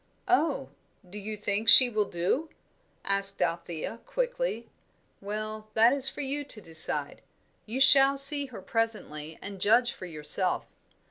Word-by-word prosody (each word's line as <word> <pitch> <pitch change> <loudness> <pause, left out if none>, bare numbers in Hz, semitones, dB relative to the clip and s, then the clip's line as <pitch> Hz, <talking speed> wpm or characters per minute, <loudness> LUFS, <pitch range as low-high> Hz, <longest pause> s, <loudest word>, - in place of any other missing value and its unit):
"Oh 305 -6 -1 0.4
do 200 +4 -10
you 210 +1 -8
think 210 +2 -2
she 255 - +9
will 215 -4 -3
do?" 185 - -3 0.6
asked 195 0 +3
Althea, 170 +4 -5
quickly. - - -4 0.5
"Well, 215 +1 -7
that 230 +3 +4
is 275 -2 +3
for - - -9
you 285 +1 -5
to 250 -6 -8
decide. 160 -5 -4 0.5
You 235 +5 -5
shall 270 +1 +5
see 280 +1 +7
her 225 -7 -12
presently 160 -9 -5
and 200 -2 -9
judge 235 +4 +2
for 185 - -11
yourself. 160 +3 -1
215 Hz, 140 wpm, -26 LUFS, 195-270 Hz, 0.6 s, she